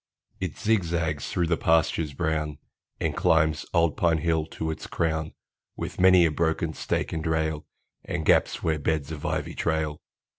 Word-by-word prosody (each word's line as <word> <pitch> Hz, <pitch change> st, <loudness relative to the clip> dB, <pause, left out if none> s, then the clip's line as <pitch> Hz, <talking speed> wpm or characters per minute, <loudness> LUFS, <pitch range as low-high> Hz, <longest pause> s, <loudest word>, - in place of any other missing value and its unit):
It 95 Hz, -5 st, -4 dB
zigzags 85 Hz, -, 0 dB
through 90 Hz, -, 0 dB
the 85 Hz, 0 st, +1 dB
pastures 80 Hz, -2 st, +2 dB
brown, 75 Hz, +1 st, -1 dB, 0.4 s
And -, -, -1 dB
climbs 80 Hz, -1 st, +2 dB
old 85 Hz, -3 st, +2 dB
Pine 85 Hz, -2 st, +3 dB
Hill 80 Hz, -1 st, 0 dB
to 80 Hz, 0 st, -3 dB
its 80 Hz, -, -7 dB
crown, 80 Hz, -1 st, -1 dB, 0.4 s
With -, -, -6 dB
many 95 Hz, -2 st, +7 dB
a 80 Hz, -, +2 dB
broken 80 Hz, +1 st, 0 dB
stake -, -, -2 dB
and 80 Hz, -, -3 dB
rail, 80 Hz, -1 st, -1 dB, 0.4 s
And -, -, -3 dB
gaps -, -, +3 dB
where 80 Hz, -1 st, +1 dB
beds 75 Hz, 0 st, -1 dB
of 75 Hz, -2 st, -4 dB
ivy -, -, -2 dB
trail. 80 Hz, -2 st, -1 dB
80 Hz, 160 wpm, -26 LUFS, 75-85 Hz, 0.4 s, many